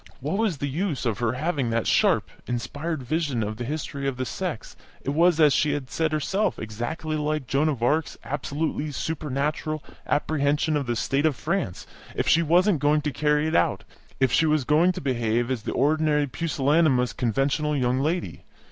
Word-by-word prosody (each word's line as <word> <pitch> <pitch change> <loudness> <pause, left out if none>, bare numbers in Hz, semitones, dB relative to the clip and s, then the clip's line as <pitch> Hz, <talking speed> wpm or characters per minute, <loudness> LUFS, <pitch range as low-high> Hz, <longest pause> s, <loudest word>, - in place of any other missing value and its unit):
What 150 +10 -2
was 215 -9 +1
the 140 - -2
use 155 0 -2
of 110 -4 -1
her 120 -1 +1
having 140 -2 -1
that 115 0 0
sharp, - - +3 0.2
inspired 145 +5 -3
vision 145 -4 -1
of 105 +1 -4
the 120 - -4
history 140 0 -4
of 135 -2 -2
the 130 - -2
sex 175 - -5 0.3
(it 140 - -1
was, 165 +2 +3
as 150 -3 +6
she 150 -1 +2
had 140 -3 -4
said 160 -1 0
herself, 190 +7 0
exactly 120 +9 -4
like 150 -1 -1
Joan 140 +5 +1
of 130 -6 -3
Arc's 150 +5 +1
absolutely 145 +2 -3
supernatural 150 +1 -2 0.2
apprehension 145 +2 +1
of 140 -3 -1
the 120 - 0
state 140 +6 +1
of 150 - 0
France) 165 - -2 0.3
if - - -1
she 165 - +5
wasn't 175 +2 +3
going 150 +2 +3
to 150 0 -2
carry 150 +2 +1
it 160 - -1
out, 85 - +2 0.4
if 130 -2 +3
she 160 +6 +3
was 155 -2 +2
going 155 +7 +4
to - - -6
behave 120 -2 0
as 125 -4 -1
the - - -4
ordinary 150 +1 +2
pusillanimous, 140 -1 +1
conventional 140 +5 0
young 125 0 +1
lady? 165 +5 -2
145 Hz, 185 wpm, -25 LUFS, 130-155 Hz, 0.4 s, as